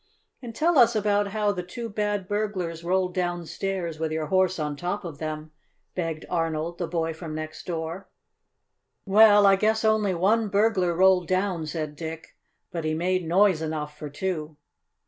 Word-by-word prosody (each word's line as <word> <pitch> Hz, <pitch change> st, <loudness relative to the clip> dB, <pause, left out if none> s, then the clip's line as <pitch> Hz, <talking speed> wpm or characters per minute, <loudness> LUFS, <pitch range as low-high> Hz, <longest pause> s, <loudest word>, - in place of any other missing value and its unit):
"And 235 Hz, -3 st, -8 dB
tell 325 Hz, +1 st, +3 dB
us 235 Hz, -1 st, +6 dB
about 205 Hz, -1 st, +2 dB
how 210 Hz, 0 st, 0 dB
the 180 Hz, -3 st, -3 dB
two 230 Hz, +7 st, -6 dB
bad 205 Hz, -2 st, -2 dB
burglars 190 Hz, -6 st, -2 dB
rolled 180 Hz, +1 st, 0 dB
downstairs 175 Hz, -1 st, -3 dB
with 160 Hz, -1 st, -1 dB
your 160 Hz, 0 st, -1 dB
horse 185 Hz, +2 st, +2 dB
on 150 Hz, -2 st, -2 dB
top 180 Hz, +6 st, -3 dB
of 160 Hz, -4 st, -7 dB
them," 155 Hz, 0 st, -5 dB, 0.4 s
begged 165 Hz, -3 st, -3 dB
Arnold, 165 Hz, 0 st, -2 dB
the 175 Hz, -, -2 dB
boy 165 Hz, -1 st, -1 dB
from 160 Hz, -1 st, -7 dB
next 155 Hz, 0 st, -7 dB
door. 170 Hz, +2 st, -4 dB, 1.0 s
"Well, 205 Hz, 0 st, +7 dB
I 195 Hz, 0 st, +7 dB
guess 220 Hz, +2 st, +1 dB
only 215 Hz, -3 st, +2 dB
one 210 Hz, +6 st, +2 dB
burglar 200 Hz, -4 st, +2 dB
rolled 185 Hz, -1 st, +4 dB
down," 185 Hz, -4 st, 0 dB
said 155 Hz, -1 st, -4 dB
Dick. 160 Hz, +1 st, -7 dB, 0.4 s
"But 170 Hz, -3 st, -4 dB
he 155 Hz, 0 st, 0 dB
made 180 Hz, +1 st, 0 dB
noise 185 Hz, -1 st, +4 dB
enough 155 Hz, -2 st, -4 dB
for 150 Hz, 0 st, -7 dB
two." 155 Hz, -1 st, -4 dB
180 Hz, 165 wpm, -26 LUFS, 160-205 Hz, 1.0 s, Well